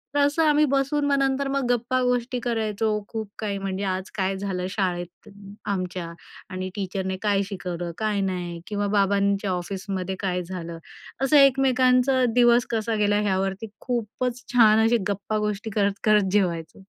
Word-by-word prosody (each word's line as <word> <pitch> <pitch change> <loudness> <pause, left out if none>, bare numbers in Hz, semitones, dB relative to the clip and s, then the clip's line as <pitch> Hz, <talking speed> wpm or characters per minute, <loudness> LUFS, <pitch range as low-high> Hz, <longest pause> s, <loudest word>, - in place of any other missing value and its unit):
तर - - +3
असं 285 +3 +3
आम्ही 300 0 +4
बसून 275 +2 +1
मग 285 -1 +2
नंतर 275 0 +1
मग 275 -2 0
गप्पा 245 +2 0
गोष्टी 250 0 0
करायचो, 225 -2 -1 0.2
खूप 220 -3 -5
काही, 205 -2 -2
म्हणजे 195 0 -3
आज 190 -1 -2
काय 190 -1 0
झालं 190 -2 -3
शाळेत 180 0 -3 0.4
आमच्या 185 -3 -3 0.4
आणि 185 -1 -4
टीचरने 190 -1 -3
काय 205 -2 +2
शिकवलं 175 -3 -5
काय 210 -1 0
नाही 175 -3 -3
किंवा 205 -1 -1
बाबांच्या 200 0 +2
ऑफिसमध्ये 190 +1 -3
काय 180 -2 -1
झालं, 170 -2 -6 0.5
असं 295 +2 +5
एकमेकांचा 260 -1 +4
दिवस 240 0 +5
कसा 225 0 -1
गेला 205 -1 +2
ह्यावरती 195 +1 -1
खूपच 245 +1 -3
छान 220 -2 +6
अशी 235 +1 +4
गप्पा 200 +2 -2
गोष्टी 210 +1 -4
करत 200 -1 +1
करत 210 -3 +4
जेवायचो. 180 -3 -1
205 Hz, 150 wpm, -24 LUFS, 190-245 Hz, 0.5 s, छान